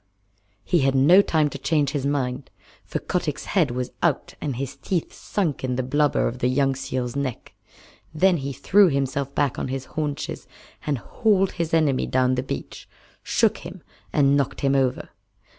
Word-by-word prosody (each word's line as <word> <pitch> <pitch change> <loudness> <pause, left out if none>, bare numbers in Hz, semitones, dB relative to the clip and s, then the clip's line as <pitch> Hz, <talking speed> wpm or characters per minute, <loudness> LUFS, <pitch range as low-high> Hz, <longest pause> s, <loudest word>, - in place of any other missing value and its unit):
He 175 - +2
had 135 -1 +2
no 160 +9 +7
time 160 -6 +1
to 140 - -7
change 145 -1 +1
his 140 -2 -1
mind, 130 -2 -2 0.3
for - - -4
Kotick's 170 -6 -3
head 170 -8 +2
was 125 +1 -3
out - - 0
and 140 -4 -2
his 135 +2 -4
teeth 175 +3 -2
sunk 170 -11 -2
in 130 -1 -1
the 130 - -1
blubber 145 +3 +1
of 120 +2 -5
the 125 - +1
young 135 +1 +2
seal's 130 -2 -4
neck. 135 -4 -4 0.6
Then 180 +3 +3
he 140 -1 -4
threw 195 +8 +4
himself 140 0 -2
back 145 -3 0
on - - -2
his 130 0 -4
haunches 150 -2 -3 0.4
and 145 -2 +1
hauled 195 - +1
his 170 -2 -3
enemy 155 -5 +2
down 130 0 +2
the 125 - 0
beach, 70 - -7 0.3
shook - - +1
him, - - -10 0.3
and 140 -1 +3
knocked 140 -2 -1
him 135 -1 +2
over. 135 -2 0
140 Hz, 175 wpm, -24 LUFS, 130-155 Hz, 0.6 s, no